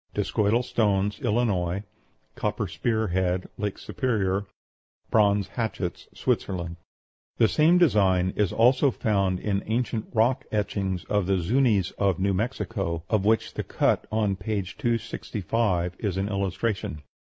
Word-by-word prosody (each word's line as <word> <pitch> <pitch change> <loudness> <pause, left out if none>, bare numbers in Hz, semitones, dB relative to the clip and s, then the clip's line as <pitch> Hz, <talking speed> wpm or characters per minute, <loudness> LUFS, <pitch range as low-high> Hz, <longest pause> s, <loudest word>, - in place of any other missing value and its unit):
DISCOIDAL 110 +4 +1
STONES, 105 -4 +1
ILLINOIS. 100 -5 0 0.5
COPPER - - -2
SPEAR 110 -3 -1
HEAD, 90 0 0
LAKE 105 -2 -2
SUPERIOR. 100 -6 -1 0.6
BRONZE 100 -2 +3
HATCHETS, 110 -6 -3
SWITZERLAND. 85 -2 -2 0.6
The 115 - +5
same 160 +8 +4
design 95 - +3
is 105 -3 +1
also 130 +5 +4
found 100 -6 0
in 100 0 -1
ancient 115 -1 -1
rock 125 +4 +2
etchings 100 -3 -1
of 105 -3 0
the 95 0 +2
Zuñis 105 0 +2
of 95 -4 +2
New 100 +1 +1
Mexico, 95 -6 -2
of 105 -3 +2
which 110 +1 +2
the - - -3
cut - - +1
on 105 -3 +1
p. 100 +1 -2
265 100 -3 -1
is 100 -4 -2
an 100 +1 -1
illustration. 100 -4 -2
100 Hz, 130 wpm, -26 LUFS, 95-115 Hz, 0.6 s, The